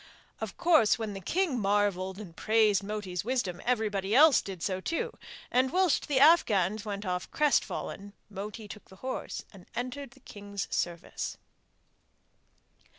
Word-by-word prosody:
Of - - -5
course 315 -11 +4
when 220 -3 -4
the 195 - -6
king 325 - 0
marvelled 195 -2 +1
and 180 -6 -10
praised 215 -1 +3
Moti's 200 -3 -4
wisdom, 230 -7 -2
everybody 215 -4 0
else 300 0 +7
did 190 -4 -7
so 190 -1 -1
too; 330 - -2 0.4
and, 255 +1 +3
whilst 370 -3 +2
the 280 -3 +2
Afghans 215 - +4
went 205 -1 -5
off 180 0 -2
crestfallen, 205 -8 0
Moti 210 +2 -7
took 210 0 -10
the 190 - -14
horse 260 - -4
and 185 -3 -15
entered 255 +3 -4
the - - -17
king's 200 -4 -6
service. 170 -1 -3
210 Hz, 145 wpm, -29 LUFS, 195-255 Hz, 0.4 s, else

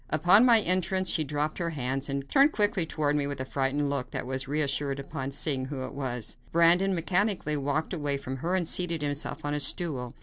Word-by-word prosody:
Upon 175 - +5
my 230 -2 +7
entrance, 185 0 +1
she 160 - +1
dropped 150 +3 -3
his 170 -1 -2
hands 135 0 -3
and 140 0 -3
turned 280 - +4
quickly 205 -5 +1
toward 150 -2 -1
me 145 -1 0
with 140 -1 -5
a 130 - -3
frightened 140 +2 -1
look, 140 -3 -3
but - - -5
was 130 +1 -4
reassured 140 -1 -1
upon 135 -1 -5
seeing 135 -1 0
who 135 -1 -5
it - - -9
was. 125 -5 -4
Brandon 175 +3 +4
mechanically 180 -2 0
walked 145 +4 -2
away 145 -4 -1
from 135 -1 -6
her 170 +7 -2
and 180 -3 0
seated 170 -3 +2
himself 145 +1 -2
on 145 - -2
a 150 - -1
stool. 140 -5 +1
145 Hz, 210 wpm, -27 LUFS, 135-175 Hz, -, my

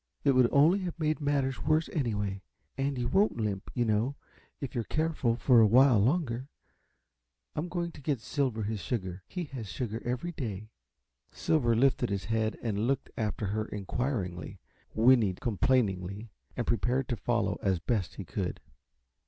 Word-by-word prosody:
It 140 - +5
would 130 -2 +5
only 160 +8 +5
have 175 -3 -5
made 155 0 0
matters 140 -2 0
worse, 155 +1 +2
anyway. 105 - -1 0.3
And 135 0 -1
you 120 -1 -1
won't 195 - +2
limp, 105 -4 -2
you 120 - +2
know, 110 +5 +1 0.4
if 140 - -5
you're 120 - -1
careful 155 -5 0
for 120 -1 +5
a 110 - +7
while 125 +1 +6
longer. 130 - +1 1.1
I'm 170 +4 -2
going 170 -1 -2
to 145 - -13
get 140 -2 -1
Silver 125 -2 -1
his 105 0 -2
sugar. 95 -5 -3
He 180 - -4
has 115 -7 -5
sugar 110 +5 -4
every 125 +8 -2
day." 110 - -5 0.6
Silver 120 -7 +1
lifted 125 0 +3
his 100 -3 -2
head 110 +1 0
and 110 -1 0
looked 135 +1 -1
after 110 -1 -2
her 110 +2 -1
inquiringly, 100 - -3 0.4
whinnied 110 -5 +4
complainingly, 105 -3 0 0.3
and 120 - -1
prepared 125 +3 0
to 120 - 0
follow 115 -4 0
as 95 -4 +2
best 100 +2 -1
he - - -7
could. - - -3
120 Hz, 160 wpm, -30 LUFS, 105-140 Hz, 1.1 s, a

